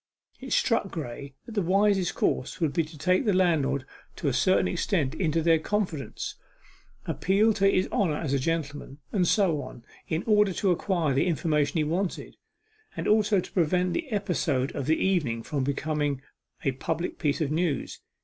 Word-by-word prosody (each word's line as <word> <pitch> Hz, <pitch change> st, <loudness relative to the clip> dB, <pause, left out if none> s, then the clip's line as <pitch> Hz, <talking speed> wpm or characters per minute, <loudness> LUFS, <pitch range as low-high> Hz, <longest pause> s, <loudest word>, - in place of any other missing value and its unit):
It -, -, -9 dB
struck 245 Hz, -, +2 dB
Graye 140 Hz, -4 st, -7 dB
that -, -, -10 dB
the 210 Hz, -2 st, 0 dB
wisest 195 Hz, 0 st, +2 dB
course 130 Hz, -, -1 dB
would 160 Hz, -5 st, 0 dB
be 165 Hz, -, +2 dB
to 155 Hz, 0 st, -12 dB
take 180 Hz, -, +2 dB
the 205 Hz, -4 st, +2 dB
landlord 150 Hz, -7 st, +2 dB, 0.3 s
to 155 Hz, -, -3 dB
a 135 Hz, -, +1 dB
certain 185 Hz, +8 st, +3 dB
extent 170 Hz, -6 st, 0 dB
into 165 Hz, -2 st, 0 dB
their 165 Hz, -1 st, +4 dB
confidence, 180 Hz, -6 st, -3 dB, 0.7 s
appeal 210 Hz, +4 st, +2 dB
to 195 Hz, -1 st, +3 dB
his 185 Hz, -1 st, +2 dB
honour 165 Hz, -7 st, +1 dB
as 145 Hz, -5 st, -2 dB
a 140 Hz, -, +2 dB
gentleman, 145 Hz, -2 st, -3 dB
and 185 Hz, -4 st, +2 dB
so 170 Hz, -8 st, +2 dB
on, 125 Hz, -2 st, -10 dB, 0.2 s
in 160 Hz, +2 st, -1 dB
order 210 Hz, -3 st, +4 dB
to 190 Hz, +1 st, +1 dB
acquire 175 Hz, -4 st, 0 dB
the 135 Hz, -, +2 dB
information 150 Hz, -2 st, +1 dB
he 155 Hz, -, +2 dB
wanted, 175 Hz, +5 st, -2 dB, 0.6 s
and -, -, -2 dB
also 210 Hz, -1 st, +3 dB
to -, -, -6 dB
prevent 180 Hz, +1 st, +1 dB
the 330 Hz, -4 st, -3 dB
episode 175 Hz, -10 st, 0 dB
of 140 Hz, -, -3 dB
the 160 Hz, -, +3 dB
evening 145 Hz, -12 st, 0 dB
from 140 Hz, +1 st, -2 dB
becoming 145 Hz, 0 st, -1 dB, 0.4 s
a 135 Hz, -, +3 dB
public 160 Hz, +6 st, -3 dB
piece 145 Hz, -4 st, 0 dB
of 150 Hz, -3 st, -1 dB
news. 160 Hz, -3 st, -1 dB
165 Hz, 180 wpm, -27 LUFS, 145-190 Hz, 0.7 s, their